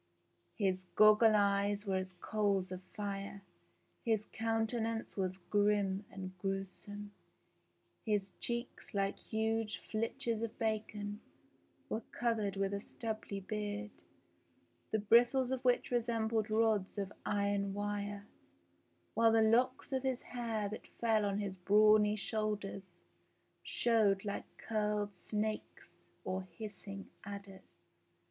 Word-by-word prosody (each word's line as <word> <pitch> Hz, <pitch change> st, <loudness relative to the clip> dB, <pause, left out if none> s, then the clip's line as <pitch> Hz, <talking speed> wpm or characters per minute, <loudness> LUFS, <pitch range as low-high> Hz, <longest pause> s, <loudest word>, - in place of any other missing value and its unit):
His 190 Hz, -4 st, +1 dB
goggle 215 Hz, +1 st, +7 dB
eyes 200 Hz, 0 st, +2 dB
were 190 Hz, -1 st, +1 dB
as 185 Hz, 0 st, -4 dB
coals 195 Hz, 0 st, 0 dB
of 185 Hz, 0 st, -5 dB
fire, 200 Hz, -1 st, -4 dB, 0.6 s
his 220 Hz, -3 st, +1 dB
coun 225 Hz, 0 st, +1 dB
tenance 225 Hz, 0 st, -2 dB
was 185 Hz, -1 st, -1 dB
grim 200 Hz, +1 st, +1 dB
and 185 Hz, -1 st, -7 dB
gruesome; 195 Hz, +2 st, -4 dB, 0.9 s
his 205 Hz, -4 st, 0 dB
cheeks, 235 Hz, -1 st, -4 dB
like 195 Hz, 0 st, 0 dB
huge 220 Hz, 0 st, -1 dB
flitches 225 Hz, 0 st, -1 dB
of 230 Hz, -1 st, -3 dB
bacon, 215 Hz, -1 st, -2 dB, 0.7 s
were 220 Hz, -, -2 dB
covered 225 Hz, -4 st, -1 dB
with 195 Hz, 0 st, 0 dB
a 200 Hz, -, -2 dB
stubbly 215 Hz, -3 st, -5 dB
beard, 210 Hz, +1 st, -3 dB, 1.0 s
the 220 Hz, -, +3 dB
bristles 245 Hz, +5 st, +5 dB
of 260 Hz, -1 st, -1 dB
which 250 Hz, 0 st, +2 dB
resembled 225 Hz, -2 st, +1 dB
rods 215 Hz, -3 st, +2 dB
of 200 Hz, 0 st, -3 dB
iron 200 Hz, -1 st, 0 dB
wire, 205 Hz, 0 st, -3 dB, 0.9 s
while 225 Hz, +1 st, +5 dB
the 225 Hz, 0 st, +5 dB
locks 250 Hz, +5 st, +3 dB
of 265 Hz, -1 st, +1 dB
hair 240 Hz, -4 st, -2 dB
that 210 Hz, -, -7 dB
fell 220 Hz, -3 st, +3 dB
on 200 Hz, 0 st, 0 dB
his 200 Hz, -2 st, -3 dB
brawny 210 Hz, +2 st, +5 dB
shoulders 200 Hz, -4 st, -3 dB, 0.6 s
showed 215 Hz, -4 st, +2 dB
like 205 Hz, -, -3 dB
curled 210 Hz, -2 st, -1 dB
snakes 215 Hz, +3 st, -4 dB, 0.2 s
or 185 Hz, 0 st, -2 dB
hissing 200 Hz, 0 st, -8 dB, 0.2 s
adders. 200 Hz, -1 st, -10 dB
210 Hz, 115 wpm, -35 LUFS, 200-225 Hz, 1.0 s, goggle